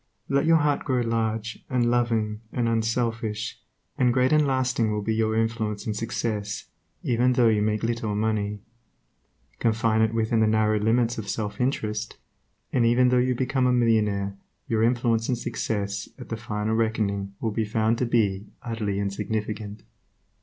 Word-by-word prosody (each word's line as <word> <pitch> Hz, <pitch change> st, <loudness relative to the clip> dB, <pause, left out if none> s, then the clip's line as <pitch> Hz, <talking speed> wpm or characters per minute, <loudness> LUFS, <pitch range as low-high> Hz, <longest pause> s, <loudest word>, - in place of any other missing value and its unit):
Let 140 Hz, +3 st, +2 dB
your 165 Hz, 0 st, +6 dB
heart 150 Hz, -2 st, +1 dB
grow 130 Hz, -3 st, +1 dB
large 115 Hz, -1 st, -2 dB
and 120 Hz, -2 st, +2 dB
loving 115 Hz, -3 st, 0 dB
and 120 Hz, -2 st, 0 dB
unselfish, 115 Hz, -1 st, -1 dB, 0.4 s
and 125 Hz, -1 st, +4 dB
great 130 Hz, +3 st, +3 dB
and 150 Hz, -1 st, +4 dB
lasting 130 Hz, -4 st, +1 dB
will 105 Hz, -1 st, -2 dB
be 110 Hz, -, 0 dB
your 110 Hz, 0 st, +1 dB
influence 110 Hz, -2 st, -1 dB
and 110 Hz, -, -2 dB
success, 105 Hz, -1 st, -3 dB, 0.4 s
even 125 Hz, +1 st, +2 dB
though 120 Hz, -2 st, +4 dB
you 105 Hz, -1 st, +2 dB
make 105 Hz, +1 st, 0 dB
little 115 Hz, -2 st, -1 dB
money. 105 Hz, -1 st, -1 dB, 1.0 s
Confine 110 Hz, -1 st, +2 dB
it 110 Hz, -1 st, +3 dB
within 115 Hz, 0 st, +1 dB
the 110 Hz, -, +4 dB
narrow 110 Hz, 0 st, +2 dB
limits 115 Hz, +2 st, +1 dB
of 100 Hz, -2 st, -6 dB
self 105 Hz, +1 st, -3 dB
interest, 110 Hz, -4 st, -2 dB, 0.6 s
and 125 Hz, -, +3 dB
even 120 Hz, +2 st, +4 dB
though 125 Hz, 0 st, +4 dB
you 125 Hz, 0 st, +2 dB
become 130 Hz, +1 st, +1 dB
a -, -, +3 dB
millionaire 105 Hz, -5 st, +2 dB, 0.3 s
your 110 Hz, -1 st, +1 dB
influence 115 Hz, -1 st, +2 dB
and 125 Hz, -, +1 dB
success, 100 Hz, -4 st, -3 dB
at -, -, -10 dB
the 115 Hz, -, -2 dB
final 110 Hz, -1 st, -2 dB
reckoning 105 Hz, -3 st, -1 dB
will 110 Hz, -, -1 dB
be 110 Hz, +1 st, 0 dB
found 110 Hz, +2 st, +1 dB
to 125 Hz, -, +1 dB
be 105 Hz, -4 st, +1 dB, 0.2 s
utterly 110 Hz, -4 st, -2 dB
insignificant. 105 Hz, +1 st, -3 dB
110 Hz, 165 wpm, -25 LUFS, 105-120 Hz, 1.0 s, your